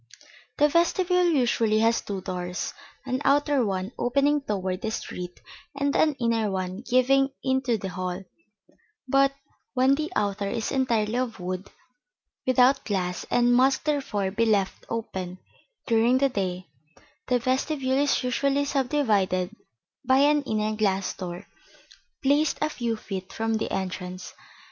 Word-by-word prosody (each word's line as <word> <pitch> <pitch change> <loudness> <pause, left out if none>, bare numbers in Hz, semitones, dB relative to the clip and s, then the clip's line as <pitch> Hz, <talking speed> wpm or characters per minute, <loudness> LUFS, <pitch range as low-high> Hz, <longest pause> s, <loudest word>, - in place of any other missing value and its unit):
] 250 - -26
The 295 - +5
vestibule 360 +3 +2
usually 235 -7 +2
has 230 +1 +3
two 195 -2 -5
doors: 180 -1 -4 0.3
an 260 +1 -2
outer 285 -1 +3
one 190 -1 -2
opening 280 +4 +2
toward 190 -6 -3
the - - -2
street 180 -4 -6 0.4
and 280 0 0
an 305 -2 +3
inner 230 -4 0
one 185 +1 -3
giving 260 +2 +3
into 260 -3 +1
the 195 -2 -5
hall; 185 +1 -4 0.8
but 275 +1 +4 0.4
when 260 +1 +4
the 310 +4 -2
outer 200 -1 0
is 225 - -2
entirely 235 -4 +1
of 245 -4 -3
wood, 185 +2 -4 0.8
without 255 +2 +4
glass, 180 -3 -2
and 245 0 +3
must 265 +4 +3
therefore 250 -10 -1
be 230 +3 +1
left 200 -3 0
open 190 -5 -4 0.5
during 230 +2 +3
the 275 +1 +3
day, 185 -5 -3 0.6
the 250 - +3
vestibule 260 +2 0
is 285 -1 +2
usually 275 +3 +1
subdivided 220 -9 +1 0.5
by 260 0 +4
an 295 +2 +4
inner 215 0 0
glass 195 -3 0
door 180 +1 -7 0.8
placed 290 +3 +3
a 305 0 0
few 235 -4 -2
feet 190 -3 -6
from 225 0 -1
the 220 - -2
entrance. 185 -1 -4
230 Hz, 140 wpm, -26 LUFS, 195-275 Hz, 0.8 s, The